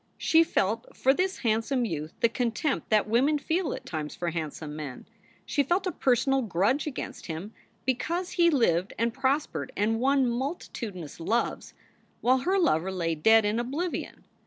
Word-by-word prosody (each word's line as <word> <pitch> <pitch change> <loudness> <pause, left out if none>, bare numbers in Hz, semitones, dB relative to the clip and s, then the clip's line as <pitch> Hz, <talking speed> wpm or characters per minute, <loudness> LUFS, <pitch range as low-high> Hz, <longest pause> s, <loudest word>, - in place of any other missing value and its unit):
She 325 0 +5
felt 225 -6 -1
for 265 - +4
this 370 +5 0
handsome 230 +3 +1
youth 155 -6 -4
the - - +6
contempt 245 +5 -1
that 215 -1 +3
women 265 +7 +3
feel 320 +1 -1
at - - -6
times 155 -3 -5
for 175 -1 -2
handsome 155 -2 -5
men. 145 -5 -7 0.4
She 285 - +1
felt 350 +7 +1
a 370 - 0
personal 270 0 +2
grudge 215 - +1
against 285 - -6
him 175 +6 -6 0.3
because 335 +8 -1
he 340 -1 +4
lived 195 - +2
and 230 +1 0
prospered 270 +3 -1
and 225 +2 +1
won 270 +1 +3
multitudinous 235 - -4
loves, 225 +8 -1 0.4
while 255 +2 +3
her 370 +9 +1
lover 190 - +2
lay 170 -3 -1
dead 220 +8 +5
in 210 +3 +1
oblivion. 290 +9 -3
235 Hz, 160 wpm, -28 LUFS, 190-280 Hz, 0.4 s, the